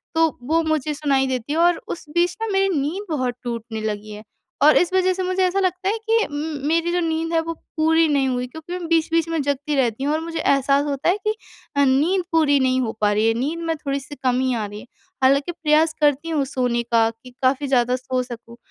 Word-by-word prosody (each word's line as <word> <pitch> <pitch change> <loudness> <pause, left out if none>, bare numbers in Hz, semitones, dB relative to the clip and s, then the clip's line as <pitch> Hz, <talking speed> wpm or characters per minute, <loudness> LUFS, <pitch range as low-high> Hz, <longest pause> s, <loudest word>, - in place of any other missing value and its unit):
तो 325 0 +4 0.2
वो 320 +6 +2
मुझे 310 -2 -1
सुनाई 280 -3 +1
देती 255 +2 -3
है - - -1
और 345 0 +4
उस 345 - -6
बीच 350 +1 +1
ना 450 - -1
मेरी 390 0 +2
नींद 330 +9 -3
बहुत 255 -6 -1
टूटने 230 -2 -5
लगी 215 0 -4
है। 210 +1 -9 0.4
और 305 +1 +7
इस 355 - +2
वजह 370 0 +3
से 375 0 -3
मुझे 370 +1 0
ऐसा 365 +2 +1
लगता 370 0 0
है 435 - 0
कि 450 0 +1
उम, 290 -1 -4
मेरी 335 +2 +1
जो 355 - +1
नींद 325 0 -1
है 330 - +3
वो 330 +1 -4 0.2
पूरी 320 +1 +4
नहीं 280 -3 +2
हुई 250 0 -2
क्योंकि 320 +6 -9
मैं 360 -2 -4
बीच-बीच 330 0 +1
में 325 -2 0
जगती 285 +1 -1
रहती 255 -2 0
हूँ 290 +2 +1
और 310 - 0
मुझे 330 0 -5
एहसास 275 0 +2
होता 285 +2 -1
है 370 - +2
कि 430 - +1 0.4
अ, 280 - +4
नींद 310 +8 +2
पूरी 305 -4 +3
नहीं 260 0 +2
हो 230 -3 -1
पा 210 -1 +3
रही 215 +2 +2
है 225 - +3
नींद 280 +8 -2
में 325 - 0
थोड़ी-सी 280 -1 -4
कमी 255 0 +1
आ 220 -2 -2
रही 205 0 -8
है। 230 - -12 0.4
हालाँकि, 280 +5 +3
प्रयास 315 -1 +2
करती 295 +2 +2
हूँ 300 -4 0
सोने 250 -3 -1
का 230 -1 +2
कि 230 +3 -14
काफ़ी 275 +2 +2
ज़्यादा 250 -2 +2
सो 255 0 -2
सकूँ। 235 -1 -10
290 Hz, 235 wpm, -22 LUFS, 255-330 Hz, 0.4 s, और